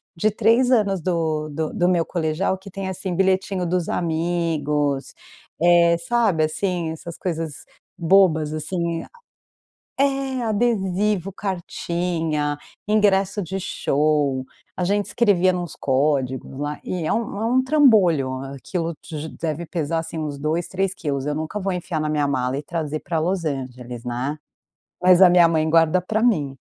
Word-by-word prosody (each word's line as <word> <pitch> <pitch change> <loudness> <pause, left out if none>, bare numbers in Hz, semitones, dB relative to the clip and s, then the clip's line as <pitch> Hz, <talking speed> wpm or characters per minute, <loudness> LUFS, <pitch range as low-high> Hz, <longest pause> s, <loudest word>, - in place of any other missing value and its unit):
de 190 +6 +2
3 230 +4 +3
anos 205 -7 +2
do 160 -3 -1
do 155 +1 -3
do 175 +1 +2
meu 170 -2 +2
colegial 170 +2 -1
que 190 +1 -12
tem, 195 0 -5
assim, 190 -1 -4
bilhetinho 190 0 +1
dos 175 0 -1
amigos, 160 -4 -1 0.5
eh, 170 0 +5
sabe, 190 -2 +1
assim, 170 +1 -1
essas 165 +1 -8
coisas 165 -4 -4 0.3
bobas 165 -4 +3
assim, 170 +1 -2
eh, - - -10 0.9
a - - +5
é, 270 -2 -1
adesivo, 205 -4 0
cartinha, 170 -5 -2 0.3
ingresso 205 -1 +2
de 190 +2 -4
show, 145 -6 0 0.3
a 180 - -2
gente 205 +3 +1
escrevia 190 -6 +3
nos 175 -3 -4
códigos 130 -1 0
lá 145 +1 -3
e 180 -2 -3
é - - 0
um 220 -2 -2
é - - 0
um 255 +3 +3
trambolho, 215 - +4 0.2
aquilo 165 +4 -3
de 155 0 -6
deve 160 +1 -3
pesar, 165 -1 -2
assim, 165 0 -6
uns 150 -2 -4
2, 155 +4 -1
3 190 0 -1
quilos, 140 -7 -3
eu 150 - -1
nunca 160 +7 -3
vou 195 -1 -1
enfiar 175 -2 -3
na 155 - -1
minha 150 -2 +1
mala 130 -1 -1
e 145 - -4
trazer 155 -2 -3
para 165 0 -2
Los 175 +1 -1
Angeles, 125 -4 -5
né. 125 +4 -3 0.7
Mas 180 0 +6
a 185 - +10
minha 175 -1 +6
mãe 160 -1 +1
guarda 165 +2 +4
para 215 +4 -1
mim. 155 - +2
170 Hz, 155 wpm, -22 LUFS, 155-190 Hz, 0.9 s, a